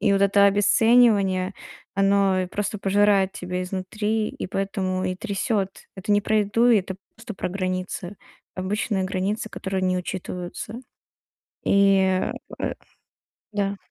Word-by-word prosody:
И -, -, +3 dB
вот 195 Hz, 0 st, +3 dB
это 200 Hz, 0 st, +5 dB
обесценивание, 205 Hz, -2 st, +4 dB, 0.4 s
оно 195 Hz, -1 st, +3 dB
просто 205 Hz, +1 st, -2 dB
пожирает 195 Hz, -1 st, +3 dB
тебя 180 Hz, 0 st, -4 dB
изнутри, 210 Hz, +4 st, -2 dB
и -, -, -6 dB
поэтому 190 Hz, -1 st, -2 dB
и 185 Hz, 0 st, -2 dB
трясёт. 200 Hz, -1 st, -1 dB, 0.3 s
Это 190 Hz, +2 st, -1 dB
не 205 Hz, -, +4 dB
про 215 Hz, +1 st, +1 dB
еду, 210 Hz, +4 st, +2 dB
это 195 Hz, -4 st, +2 dB, 0.2 s
просто 225 Hz, -1 st, -8 dB
про -, -, -3 dB
границы. 185 Hz, 0 st, -3 dB, 0.4 s
Обычные 195 Hz, +1 st, -1 dB
границы, 195 Hz, +3 st, -2 dB
которые 190 Hz, -1 st, -3 dB
не 185 Hz, 0 st, +1 dB
учитываются. 180 Hz, +3 st, -6 dB, 0.9 s
И, 195 Hz, -1 st, +4 dB, 0.4 s
э -, -, -1 dB, 0.8 s
да. 200 Hz, -1 st, -1 dB
195 Hz, 125 wpm, -24 LUFS, 185-205 Hz, 0.9 s, это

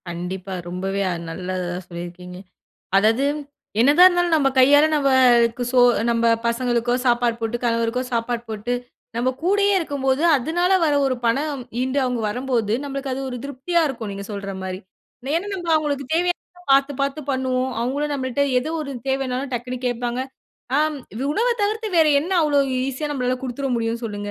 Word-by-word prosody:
கண்டிப்பா. 180 Hz, +2 st, -5 dB, 0.2 s
ரொம்பவே 195 Hz, +2 st, -2 dB
அ -, -, -1 dB, 0.2 s
நல்லது 180 Hz, +2 st, -4 dB
தான் 180 Hz, 0 st, -6 dB
சொல்லியிருக்கீங்க. 175 Hz, +1 st, -8 dB, 0.6 s
அதாவது 220 Hz, +6 st, +3 dB, 0.6 s
என்னதான் 290 Hz, +9 st, +7 dB
இருந்தாலும் 350 Hz, -2 st, +1 dB
நம்ம 280 Hz, -3 st, +3 dB
கையால 290 Hz, +3 st, +7 dB
நமக்கு 250 Hz, -4 st, +4 dB
சோ 255 Hz, -1 st, +4 dB, 0.3 s
நம்ம 235 Hz, 0 st, +1 dB, 0.2 s
பசங்களுக்கோ 240 Hz, 0 st, 0 dB
சாப்பாடு 240 Hz, -1 st, +2 dB
போட்டு, 225 Hz, +1 st, -1 dB
கணவருக்கோ 230 Hz, +1 st, 0 dB
சாப்பாடு 235 Hz, 0 st, -1 dB
போட்டு, 220 Hz, +3 st, -3 dB, 0.4 s
நம்ம 240 Hz, +2 st, +1 dB
கூடயே 405 Hz, +3 st, +3 dB
இருக்கும்போது, 280 Hz, -4 st, -1 dB
அதனால 345 Hz, +8 st, 0 dB
வர 300 Hz, -2 st, +2 dB
ஒரு 260 Hz, -1 st, 0 dB
பணம் 280 Hz, +3 st, 0 dB, 0.2 s
ஈண்டு, 260 Hz, +2 st, 0 dB
அவுங்க 250 Hz, -2 st, -1 dB
வரம்போது 240 Hz, -2 st, -1 dB
நம்மளுக்கு 275 Hz, -1 st, -4 dB
அது 260 Hz, -, -3 dB
ஒரு 250 Hz, -, -4 dB
திருப்தியா 285 Hz, +5 st, 0 dB
இருக்கும் 235 Hz, -6 st, -5 dB
நீங்க 200 Hz, 0 st, -6 dB
சொல்ற 200 Hz, -1 st, -5 dB
மாரி. 185 Hz, 0 st, -5 dB, 0.5 s
மேலும் 340 Hz, +7 st, -1 dB
நம்ம 350 Hz, -3 st, -6 dB
அவங்களுக்கு 290 Hz, -3 st, -1 dB
தேவையானத 355 Hz, +1 st, -2 dB
பாத்து 275 Hz, +1 st, +4 dB
பாத்து 280 Hz, +2 st, -1 dB
பண்ணுவோம். 260 Hz, -1 st, 0 dB
அவுங்களும் 285 Hz, +5 st, -1 dB
நம்மள்ட்ட 260 Hz, -1 st, -2 dB, 0.2 s
எது 260 Hz, -, -5 dB
ஒரு 290 Hz, -2 st, -5 dB, 0.2 s
தேவனாலும் 265 Hz, 0 st, -2 dB
டக்குனு 250 Hz, +1 st, -4 dB
கேட்பாங்க. 245 Hz, 0 st, -2 dB, 0.6 s
ஆம். 305 Hz, 0 st, +1 dB, 0.4 s
உணவ 460 Hz, +10 st, +1 dB
தவிர்த்து 435 Hz, +2 st, -1 dB
வேற 320 Hz, -, +6 dB
என்ன 345 Hz, +6 st, -4 dB
அவ்வளவு 285 Hz, -3 st, +2 dB, 0.2 s
ஈசியா 275 Hz, +3 st, -3 dB
நம்மளால 255 Hz, -3 st, -1 dB
குடுத்துற 265 Hz, +1 st, -3 dB
முடியும் 230 Hz, +1 st, -2 dB
சொல்லுங்க. 205 Hz, -2 st, -4 dB
255 Hz, 155 wpm, -22 LUFS, 230-290 Hz, 0.6 s, என்னதான்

